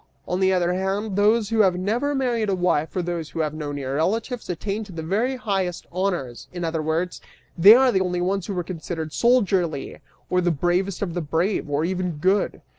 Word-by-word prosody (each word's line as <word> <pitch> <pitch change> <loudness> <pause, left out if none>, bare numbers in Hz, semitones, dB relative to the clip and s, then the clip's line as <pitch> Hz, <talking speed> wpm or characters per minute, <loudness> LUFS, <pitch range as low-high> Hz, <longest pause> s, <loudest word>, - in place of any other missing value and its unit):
On 180 - -1
the 190 0 +3
other 180 -1 +2
hand, 195 +2 -2
those 210 +1 +3
who 225 -1 0
have 190 -4 +4
never 235 +10 0
married 240 -5 0
a 195 - +2
wife, 175 -4 0
or 180 - 0
those 170 -2 -3
who 165 - -3
have 155 -1 -1
no 150 -2 -5
near 140 -1 -3
relatives, 225 +8 -1
attain 200 +5 -3
to 200 - -12
the 165 -2 -6
very 220 +10 0
highest 195 -7 -2
honors; 175 -10 -2
in 175 -1 -5
other 160 -1 -1
words, 160 +4 -2 0.3
they 195 +6 +9
are 260 0 +5
the 190 - +2
only 180 -1 -1
ones 190 +1 -1
who 200 -3 -4
are 175 - 0
considered 160 -2 -5
soldierly, 190 - +1 0.3
or 180 0 +1
the 175 - +2
bravest 175 +5 0
of 175 -4 -3
the 175 - -2
brave, 165 +3 -1
or 145 +2 0
even 180 -1 -2
good. 185 +7 0
180 Hz, 210 wpm, -23 LUFS, 165-205 Hz, 0.3 s, they